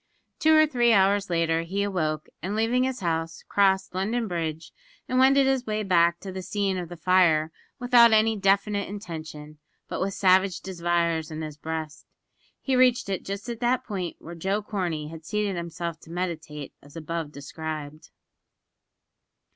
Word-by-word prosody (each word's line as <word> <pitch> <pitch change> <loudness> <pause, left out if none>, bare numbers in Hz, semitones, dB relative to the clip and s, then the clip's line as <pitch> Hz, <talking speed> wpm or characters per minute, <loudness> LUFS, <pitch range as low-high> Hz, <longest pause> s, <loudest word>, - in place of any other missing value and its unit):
Two 315 0 +5
or 310 0 +7
three 240 -6 +3
hours 200 0 +3
later 165 -1 +1
he 190 +4 -2
awoke, 155 -6 -1 0.2
and 195 +3 -3
leaving 235 +4 +2
his 260 -2 -3
house, 165 -2 -2
crossed 190 -1 +2
London 220 +5 -1
Bridge, 160 -3 -4 0.4
and 255 - +1
wended 270 +1 +5
his 265 -2 +1
way 215 0 -1
back 170 -3 +3
to 190 - -6
the 190 0 -5
scene 200 0 -1
of 175 -2 -6
the 175 - -8
fire 165 -3 +3 0.3
without 245 -2 +6
any 220 0 +4
definite 200 0 +1
intention, 155 -6 -8 0.3
but - - -4
with 195 +1 -1
savage 190 -1 +3
desires 170 -3 -1
in 160 0 -5
his 155 -1 -6
breast. 155 0 -6 0.5
He 265 - 0
reached 250 -4 +3
it 190 -3 -2
just 200 +4 -6
at 235 -2 -5
that 245 +1 +1
point 185 -5 -4
where 170 - -10
Joe 195 +5 -2
Corney 175 -8 -3
had 160 0 -10
seated 210 +2 -1
himself 170 -1 -5
to 165 - -17
meditate, 160 -5 -5
as 145 +2 -17
above 165 -1 -4
described. 155 +1 -7
185 Hz, 165 wpm, -26 LUFS, 165-210 Hz, 0.5 s, or